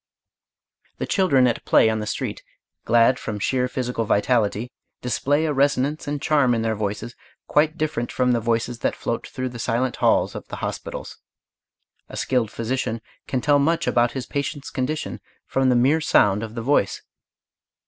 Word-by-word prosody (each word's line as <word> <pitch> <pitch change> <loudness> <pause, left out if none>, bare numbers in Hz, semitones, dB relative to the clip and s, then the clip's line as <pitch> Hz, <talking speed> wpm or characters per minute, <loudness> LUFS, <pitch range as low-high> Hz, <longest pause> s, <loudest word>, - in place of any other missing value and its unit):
The - - -2
children 155 -11 +3
at 120 -2 0
play - - +5
on 110 0 +1
the 105 - -4
street, - - -3 0.4
glad 120 +2 +4
from 105 - -4
sheer 125 +5 0
physical 125 -2 -2
vitality, 110 +1 +1 0.3
display 145 +5 0
a 150 - 0
resonance 140 +2 +1
and 145 0 -2
charm 140 -4 +3
in 115 - -1
their 110 -1 +1
voices 105 +3 -4 0.3
quite 155 +2 +2
different 150 -7 -2
from 125 -1 +1
the 120 - +2
voices 115 +1 -1
that - - 0
float 115 - -3
through 130 -1 -4
the 120 -1 -9
silent 125 +2 -1
halls - - +2
of - - -8
the - - -6
hospitals. - - -6 0.9
A - - -8
skilled 125 -5 0
physician 115 0 -2 0.3
can 130 - -1
tell 145 +1 +4
much 165 +4 +1
about 120 0 +2
his 130 -3 -4
patient's 140 +1 -4
condition 140 +4 -3 0.2
from 135 -1 +1
the 125 - +4
mere 135 +7 +3
sound 105 -8 +3
of 110 0 -6
the 115 - -4
voice. 125 -6 +1
125 Hz, 170 wpm, -23 LUFS, 115-140 Hz, 0.9 s, play